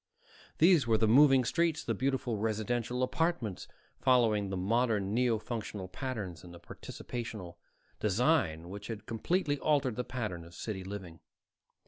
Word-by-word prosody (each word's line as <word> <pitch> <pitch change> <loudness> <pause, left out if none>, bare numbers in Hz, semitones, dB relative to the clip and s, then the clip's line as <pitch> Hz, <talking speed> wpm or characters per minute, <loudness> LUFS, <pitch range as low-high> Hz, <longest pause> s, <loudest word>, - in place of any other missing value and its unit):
These 165 -5 +5
were 115 -1 +4
the 110 - +2
moving 135 +2 +6
streets, 165 +3 +1
the 115 - -1
beautiful 130 0 -1
residential 115 +3 -1
apartments, 160 - -1 0.3
following 110 -6 +3
the 95 - -3
modern 105 0 +1
neo 120 -1 +2
functional 105 -3 -5
patterns 100 -5 -5
and 85 -1 -11
participational 95 -1 -7 0.4
design 105 - +1
which 100 +2 -7
had 110 -2 -6
completely 145 - 0
altered 140 -7 +1
the 125 - 0
pattern 115 -9 -4
of 85 +1 -14
city 100 -4 -5
living. 95 -4 -7
115 Hz, 135 wpm, -31 LUFS, 100-130 Hz, 0.4 s, moving